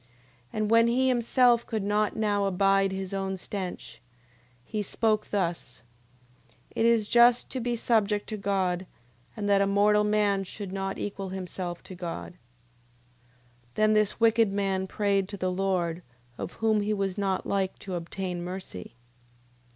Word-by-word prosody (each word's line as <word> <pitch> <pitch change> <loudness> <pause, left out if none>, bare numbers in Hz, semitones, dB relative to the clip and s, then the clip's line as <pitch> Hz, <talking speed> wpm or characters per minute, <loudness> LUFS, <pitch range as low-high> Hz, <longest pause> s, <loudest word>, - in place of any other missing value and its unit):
9:12. 125 - -31 0.5
And 215 0 -1
when 230 0 +6
he 255 +3 +2
himself 240 -1 +3
could 220 -4 -2
not 210 +1 +1
now 205 -2 +1
abide 195 0 +2
his 190 0 -5
own 195 -1 -2
stench, 180 - -6 0.6
he 215 - -3
spoke 215 +1 0
thus: 170 -11 -3 0.9
It 225 - +3
is 230 -3 +3
just 240 +1 +5
to 260 - -3
be 240 0 -1
subject 210 -3 +1
to 215 - -3
God, 190 -2 -1 0.5
and 205 -1 -2
that 200 -1 +4
a 200 - +3
mortal 210 +1 +4
man 210 -2 +2
should 195 0 -7
not 195 0 -3
equal 195 -1 -4
himself 180 -1 -5
to - - -10
God. 165 - -6
9:13. - - -26 1.4
Then 215 0 +3
this 215 -1 +1
wicked 225 -2 +4
man 195 -1 -1
prayed 200 -1 0
to 200 - -6
the 185 0 -1
Lord, 180 -3 -1 0.3
of - - -6
whom 220 -1 +1
he 210 +1 0
was 195 -2 -1
not 195 -2 -1
like 195 -1 -1
to 190 - -7
obtain 175 +1 -4
mercy. 180 - -7
200 Hz, 160 wpm, -27 LUFS, 185-215 Hz, 1.4 s, when